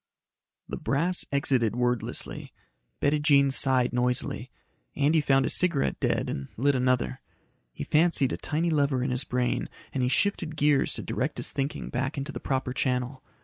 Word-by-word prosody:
The -, -, -5 dB
brass 170 Hz, +6 st, +2 dB
exited 130 Hz, -5 st, +1 dB
wordlessly. 125 Hz, -1 st, -3 dB, 0.5 s
Bettijean 145 Hz, -1 st, +3 dB
sighed 130 Hz, -3 st, +4 dB
noisily. 125 Hz, 0 st, 0 dB, 0.5 s
Andy 150 Hz, +3 st, +2 dB
found 135 Hz, -2 st, +2 dB
his -, -, +1 dB
cigarette 170 Hz, -6 st, +1 dB
dead -, -, 0 dB
and 70 Hz, -1 st, -4 dB
lit 140 Hz, +5 st, +2 dB
another. 125 Hz, -, 0 dB, 0.5 s
He -, -, -6 dB
fancied 155 Hz, -4 st, +2 dB
a -, -, -3 dB
tiny 165 Hz, +3 st, -1 dB
lever 140 Hz, -4 st, +1 dB
in 130 Hz, -, -1 dB
his 125 Hz, +1 st, -1 dB
brain 125 Hz, 0 st, -1 dB, 0.2 s
and 135 Hz, -, -1 dB
he 125 Hz, -, +1 dB
shifted 170 Hz, -1 st, 0 dB
gears 145 Hz, -2 st, +2 dB
to -, -, -4 dB
direct -, -, -3 dB
his -, -, -3 dB
thinking 140 Hz, +1 st, -3 dB
back 130 Hz, +4 st, -2 dB
into 140 Hz, +2 st, -4 dB
the -, -, -6 dB
proper 130 Hz, -2 st, -2 dB
channel. 130 Hz, 0 st, -1 dB
135 Hz, 160 wpm, -27 LUFS, 125-145 Hz, 0.5 s, sighed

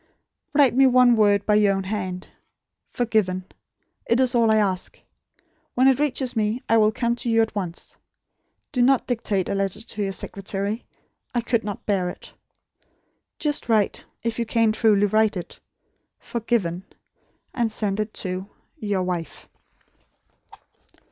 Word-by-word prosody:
"Write 280 Hz, -3 st, +5 dB
me 265 Hz, +2 st, +5 dB
one 250 Hz, -1 st, +5 dB
word 205 Hz, -2 st, +3 dB
by 210 Hz, -, +2 dB
your 205 Hz, -2 st, +4 dB
own 195 Hz, -, -2 dB
hand: 185 Hz, -2 st, -4 dB, 0.6 s
'Forgiven.' 210 Hz, -6 st, 0 dB, 0.6 s
It 235 Hz, -, +2 dB
is 260 Hz, -1 st, +3 dB
all 230 Hz, -2 st, +3 dB
I 220 Hz, -, +4 dB
ask. 190 Hz, -3 st, -1 dB, 0.8 s
When 255 Hz, +2 st, +4 dB
it 265 Hz, -1 st, +4 dB
reaches 265 Hz, -4 st, -1 dB
me, 220 Hz, +2 st, 0 dB
I 225 Hz, -, +4 dB
will 215 Hz, -1 st, +4 dB
come 235 Hz, +2 st, 0 dB
to 240 Hz, -, -3 dB
you 225 Hz, 0 st, +3 dB
at 225 Hz, -, -4 dB
once. 180 Hz, -5 st, -5 dB, 0.8 s
Do 250 Hz, -, 0 dB
not 260 Hz, +1 st, +4 dB
dictate 215 Hz, -6 st, -1 dB
a -, -, -1 dB
letter 195 Hz, 0 st, -1 dB
to 215 Hz, -1 st, -7 dB
your 195 Hz, -1 st, -1 dB
secretary. 200 Hz, +3 st, -4 dB, 0.5 s
I 240 Hz, -, +2 dB
could 235 Hz, -1 st, 0 dB
not 205 Hz, -1 st, -6 dB
bear 190 Hz, -4 st, 0 dB
it. -, -, -10 dB, 1.0 s
Just 295 Hz, -5 st, -2 dB
write 215 Hz, -3 st, +1 dB, 0.2 s
if 230 Hz, 0 st, -2 dB
you 235 Hz, -, 0 dB
can 225 Hz, -1 st, +3 dB
truly 215 Hz, -2 st, +3 dB
write 215 Hz, 0 st, +2 dB
it 175 Hz, -, -8 dB, 0.6 s
'FORGIVEN'; 210 Hz, -7 st, -2 dB, 0.7 s
and 235 Hz, -3 st, 0 dB
send 205 Hz, -2 st, -2 dB
it 215 Hz, 0 st, -2 dB
to 185 Hz, +1 st, -3 dB, 0.3 s
'Your 205 Hz, -3 st, -1 dB
Wife.'" 175 Hz, -4 st, -4 dB
215 Hz, 150 wpm, -23 LUFS, 195-235 Hz, 1.0 s, Write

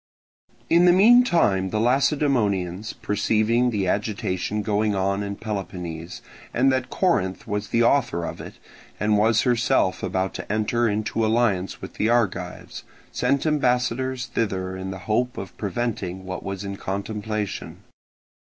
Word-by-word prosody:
In 170 Hz, +4 st, +5 dB
the 175 Hz, -, +7 dB
meantime 180 Hz, -, +5 dB
the 110 Hz, -, -1 dB
Lacedaemonians 115 Hz, -, +1 dB
perceiving 110 Hz, +2 st, +1 dB
the 100 Hz, -5 st, -1 dB
agitation 105 Hz, 0 st, -1 dB
going 105 Hz, 0 st, +1 dB
on 100 Hz, +1 st, 0 dB
in 100 Hz, 0 st, -4 dB
Peloponnese, 90 Hz, -6 st, -6 dB, 0.3 s
and 135 Hz, +3 st, +4 dB
that 130 Hz, -1 st, -1 dB
Corinth 95 Hz, -, 0 dB
was 105 Hz, 0 st, -2 dB
the 115 Hz, 0 st, +2 dB
author 120 Hz, -9 st, +2 dB
of -, -, -6 dB
it -, -, -10 dB, 0.4 s
and 105 Hz, 0 st, +2 dB
was 110 Hz, +2 st, +3 dB
herself 120 Hz, -5 st, +2 dB
about 95 Hz, 0 st, -1 dB
to -, -, -6 dB
enter 110 Hz, +2 st, +1 dB
into 110 Hz, +2 st, -1 dB
alliance 110 Hz, -4 st, 0 dB
with -, -, -7 dB
the 110 Hz, -, 0 dB
Argives, 95 Hz, -7 st, -1 dB, 0.3 s
sent 135 Hz, +4 st, 0 dB
ambassadors 130 Hz, -3 st, 0 dB
thither 95 Hz, -5 st, -2 dB
in 95 Hz, 0 st, -5 dB
the 95 Hz, -, -5 dB
hope 120 Hz, +4 st, 0 dB
of 95 Hz, -, -7 dB
preventing 100 Hz, -3 st, -3 dB
what 95 Hz, -1 st, -5 dB
was 100 Hz, 0 st, -5 dB
in 100 Hz, 0 st, -5 dB
contemplation. 105 Hz, +1 st, -4 dB
105 Hz, 140 wpm, -24 LUFS, 95-120 Hz, 0.4 s, the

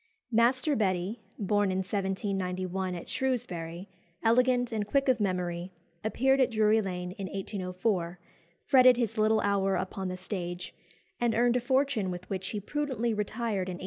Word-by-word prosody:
Master 255 Hz, +6 st, +3 dB
Betty, 195 Hz, 0 st, 0 dB, 0.2 s
born 205 Hz, 0 st, +1 dB
in 185 Hz, -, -1 dB
1791 190 Hz, -1 st, -2 dB
at 170 Hz, -, -7 dB
Shrewsbury, 185 Hz, -9 st, -3 dB, 0.4 s
elegant, 245 Hz, +1 st, +3 dB
and 215 Hz, -2 st, -2 dB
quick 275 Hz, +4 st, +1 dB
of 255 Hz, -3 st, +3 dB
memory, 180 Hz, -2 st, -1 dB, 0.3 s
appeared 265 Hz, +5 st, +2 dB
at 260 Hz, -, +4 dB
Drury 220 Hz, -1 st, +3 dB
Lane 180 Hz, -2 st, -4 dB
in 195 Hz, -, -3 dB
1804, 185 Hz, -2 st, -2 dB, 0.5 s
fretted 255 Hz, -3 st, +7 dB
his 225 Hz, -2 st, -1 dB
little 215 Hz, 0 st, +4 dB
hour 195 Hz, -1 st, +2 dB
upon 190 Hz, 0 st, -3 dB
the 185 Hz, 0 st, -4 dB
stage, 180 Hz, -2 st, -5 dB, 0.5 s
and 240 Hz, -1 st, +1 dB
earned 240 Hz, +1 st, +3 dB
a -, -, -1 dB
fortune 260 Hz, -5 st, +1 dB
with 180 Hz, 0 st, -6 dB
which 190 Hz, 0 st, -3 dB
he 210 Hz, -, -3 dB
prudently 240 Hz, -1 st, -1 dB
retired 210 Hz, -2 st, -2 dB
in -, -, -3 dB
1808. -, -, -10 dB
205 Hz, 155 wpm, -29 LUFS, 185-240 Hz, 0.5 s, fretted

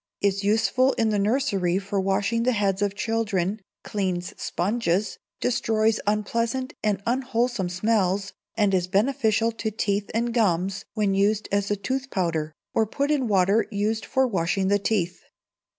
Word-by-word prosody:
is 200 Hz, 0 st, 0 dB
useful 225 Hz, +6 st, +3 dB
in 225 Hz, -1 st, +1 dB
the 210 Hz, -1 st, +1 dB
nursery 200 Hz, -5 st, +1 dB
for 195 Hz, 0 st, -2 dB
washing 195 Hz, +4 st, 0 dB
the 250 Hz, +2 st, +2 dB
heads 200 Hz, -2 st, 0 dB
of 205 Hz, -1 st, 0 dB
children, 215 Hz, -3 st, -1 dB, 0.2 s
cleans 185 Hz, -4 st, -2 dB
sponges, 200 Hz, 0 st, -1 dB, 0.2 s
destroys 220 Hz, -2 st, +1 dB
unpleasant 230 Hz, +5 st, -1 dB
and 205 Hz, -2 st, 0 dB
unwholesome 240 Hz, -5 st, 0 dB
smells, 195 Hz, 0 st, 0 dB, 0.2 s
and 205 Hz, -3 st, +2 dB
is 180 Hz, -1 st, +1 dB
beneficial 220 Hz, +2 st, +2 dB
to 225 Hz, -1 st, -3 dB
teeth 205 Hz, -1 st, -1 dB
and 235 Hz, +1 st, 0 dB
gums 190 Hz, -4 st, +1 dB
when 205 Hz, -3 st, +1 dB
used 205 Hz, +2 st, +1 dB
as 200 Hz, 0 st, +1 dB
a 205 Hz, -, +1 dB
tooth 260 Hz, +6 st, -3 dB
powder, 165 Hz, -6 st, -1 dB, 0.2 s
or 220 Hz, -, +2 dB
put 280 Hz, +7 st, -1 dB
in 275 Hz, -5 st, +1 dB
water 200 Hz, +2 st, +3 dB
used 215 Hz, +1 st, -1 dB
for 265 Hz, 0 st, +1 dB
washing 190 Hz, -3 st, 0 dB
the 205 Hz, 0 st, +3 dB
teeth. 185 Hz, -4 st, -1 dB
205 Hz, 150 wpm, -25 LUFS, 195-230 Hz, 0.2 s, useful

